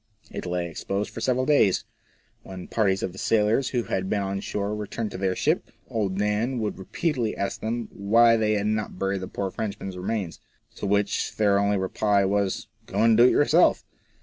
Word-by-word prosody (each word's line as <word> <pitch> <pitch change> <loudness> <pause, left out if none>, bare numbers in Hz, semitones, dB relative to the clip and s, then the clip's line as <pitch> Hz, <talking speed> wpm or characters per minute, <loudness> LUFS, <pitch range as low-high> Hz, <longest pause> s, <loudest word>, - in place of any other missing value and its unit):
It - - -5
lay 90 0 -1
exposed 100 +4 -3
for 115 - -7
several 130 +2 +1
days. 140 -11 +3 0.6
When 95 -1 -9
parties 100 -3 +1
of 95 - -2
the 95 - -11
sailors 110 +4 +2
who 120 -2 -1
had 95 -2 -2
been 100 -2 0
on 95 0 -2
shore 100 +1 -3
returned 105 +1 -4
to - - -6
their 95 -1 0
ship, - - 0 0.2
old 100 -4 -1
Dan 105 +5 0
would 110 -4 -3
repeatedly 120 - -2
ask 100 - -3
them 115 +1 -2
why 115 +4 +4
they 110 -1 +1
had 105 -1 0
not 105 -2 -2
buried 95 0 -1
the 95 - -5
poor 95 0 -4
Frenchman's 100 -3 -5
remains? 95 -2 -3 0.4
To - - -3
which 100 0 0
their 100 -2 +3
only 100 0 +2
reply 100 +1 +1
was, 100 0 0
" 110 - -36
Go - - 0
and 115 -1 +5
do 120 +2 +7
it - - +7
yourself." 145 - +3
105 Hz, 200 wpm, -25 LUFS, 95-110 Hz, 0.6 s, do